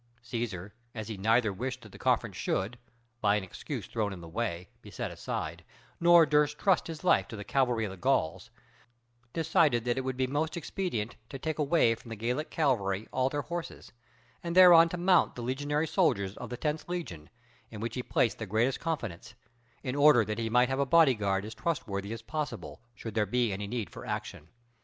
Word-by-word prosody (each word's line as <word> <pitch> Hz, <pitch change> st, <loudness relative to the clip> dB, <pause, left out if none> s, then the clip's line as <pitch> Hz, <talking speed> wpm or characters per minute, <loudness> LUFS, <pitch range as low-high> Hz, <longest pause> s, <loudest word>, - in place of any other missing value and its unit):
Cæsar, 110 Hz, -5 st, -4 dB, 0.2 s
as 110 Hz, -1 st, -5 dB
he 110 Hz, -, -4 dB
neither 110 Hz, +1 st, +2 dB
wished 125 Hz, +5 st, -4 dB
that 110 Hz, -3 st, -13 dB
the -, -, -13 dB
conference -, -, +1 dB
should, 110 Hz, +6 st, -2 dB, 0.4 s
by 105 Hz, -2 st, +3 dB
an 105 Hz, -, -1 dB
excuse 95 Hz, -, -6 dB
thrown 110 Hz, -3 st, -2 dB
in 95 Hz, -, -7 dB
the 85 Hz, -, -10 dB
way, 90 Hz, -1 st, -3 dB
be 105 Hz, -, -12 dB
set 90 Hz, -, -4 dB
aside, -, -, -5 dB, 0.4 s
nor 170 Hz, -1 st, +7 dB
durst 150 Hz, 0 st, +2 dB
trust 195 Hz, -4 st, +2 dB
his 165 Hz, 0 st, -7 dB
life 180 Hz, -, +3 dB
to -, -, -8 dB
the 105 Hz, -, -6 dB
cavalry 120 Hz, -1 st, +1 dB
of 100 Hz, -, -5 dB
the 95 Hz, -, -9 dB
Gauls, 95 Hz, -5 st, 0 dB, 0.8 s
decided 160 Hz, -7 st, +2 dB
that 120 Hz, +1 st, 0 dB
it -, -, -1 dB
would 130 Hz, -1 st, -3 dB
be 130 Hz, -, +2 dB
most 150 Hz, +5 st, -2 dB
expedient 165 Hz, -, -3 dB
to 135 Hz, -, -6 dB
take 155 Hz, +3 st, -3 dB
away 145 Hz, -5 st, +3 dB
from 115 Hz, +1 st, -11 dB
the 115 Hz, -, -5 dB
Gallic 125 Hz, +8 st, -2 dB
cavalry 110 Hz, -9 st, 0 dB
all 130 Hz, 0 st, +1 dB
their 145 Hz, +1 st, -2 dB
horses, 170 Hz, 0 st, -6 dB, 0.5 s
and 170 Hz, 0 st, -3 dB
thereon 175 Hz, -2 st, +9 dB
to 180 Hz, -, -4 dB
mount 180 Hz, +1 st, +3 dB
the 120 Hz, -, -6 dB
legionary 145 Hz, +5 st, -1 dB
soldiers 110 Hz, -, +1 dB
of -, -, -8 dB
the 125 Hz, -, -5 dB
tenth 150 Hz, +5 st, -3 dB
legion, 90 Hz, -, -5 dB, 0.4 s
in 110 Hz, -, -9 dB
which 115 Hz, +1 st, -3 dB
he 125 Hz, -, -2 dB
placed 115 Hz, -3 st, 0 dB
the 115 Hz, -, -4 dB
greatest 115 Hz, +6 st, +1 dB
confidence; 120 Hz, -, -4 dB, 0.5 s
in 130 Hz, -1 st, -3 dB
order 145 Hz, -6 st, +6 dB
that 105 Hz, +2 st, -3 dB
he 115 Hz, -1 st, -1 dB
might 125 Hz, +2 st, +4 dB
have 135 Hz, +1 st, -1 dB
a -, -, +4 dB
body 160 Hz, -3 st, +6 dB
guard 100 Hz, -3 st, -1 dB
as 110 Hz, -, -7 dB
trustworthy 105 Hz, -, -3 dB
as 115 Hz, 0 st, -6 dB
possible, 150 Hz, -1 st, -5 dB
should 110 Hz, -1 st, -7 dB
there 105 Hz, -2 st, +1 dB
be 120 Hz, 0 st, +1 dB
any 100 Hz, +1 st, -4 dB
need 115 Hz, -2 st, -3 dB
for -, -, -9 dB
action. 75 Hz, -, -5 dB
120 Hz, 205 wpm, -30 LUFS, 105-150 Hz, 0.8 s, thereon